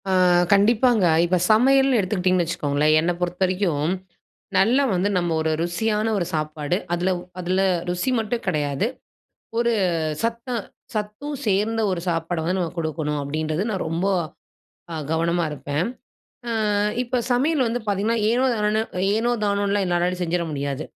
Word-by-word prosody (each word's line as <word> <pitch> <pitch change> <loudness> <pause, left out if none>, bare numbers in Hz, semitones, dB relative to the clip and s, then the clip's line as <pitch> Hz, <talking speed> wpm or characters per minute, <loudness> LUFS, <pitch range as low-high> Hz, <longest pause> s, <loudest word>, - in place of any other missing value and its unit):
ஆ - - +1 0.4
கண்டிப்பாங்க. 220 +1 +4 0.2
இப்ப 180 +1 +2
சமையல்னு 265 +3 +5
எடுத்துக்கிட்டிங்கன்னு 185 -2 +1
வச்சுக்கோங்களேன். 150 -2 +1
என்ன 170 +2 +1
பொறுத்த 180 +1 -3
வரைக்கும் 180 -5 0 0.7
நல்லா 245 +8 +4
வந்து 185 +2 +1
நம்ம 175 -2 0
ஒரு 160 0 0
ருசியான 210 +5 0
ஒரு 180 - 0
சாப்பாடு 155 +2 -2 0.2
அதில 175 +2 0 0.3
அதில 185 +2 0 0.3
ருசி 180 +8 -1
மட்டும் 230 +2 -3
கிடையாது. 150 +2 0 0.7
ஒரு 235 0 +2 0.5
சத்த 230 +2 -2 0.5
சத்தும் 215 +8 -4
சேர்ந்த 215 +3 +1
ஒரு 180 -2 -1
சாப்பாடு 165 0 -1
வந்து 180 +3 0
நம்ம 175 -3 -2
குடுக்கணும், 155 -2 -2
அப்டின்றது 155 +4 -2
நான் 190 -3 -2
ரொம்ப 165 +4 -1 0.9
அ - - -4 0.2
கவனமா 170 +1 +1
இருப்பேன். 150 +3 -2 0.9
ஆ - - +1 0.3
இப்ப 245 0 -1
சமையல் 275 +3 +2
வந்து 235 +2 -1
பார்த்தீங்கன்னா, 205 +3 +1
ஏனோ 245 +3 +2
தானோனு 210 0 +1 0.3
ஏனோ 230 +3 +1
தானோன்னுலாம் 200 -1 +1
என்னாலாம் 180 +1 0
செஞ்சிட 175 0 0
முடியாது. 140 0 -3
185 Hz, 135 wpm, -23 LUFS, 165-220 Hz, 0.9 s, சமையல்னு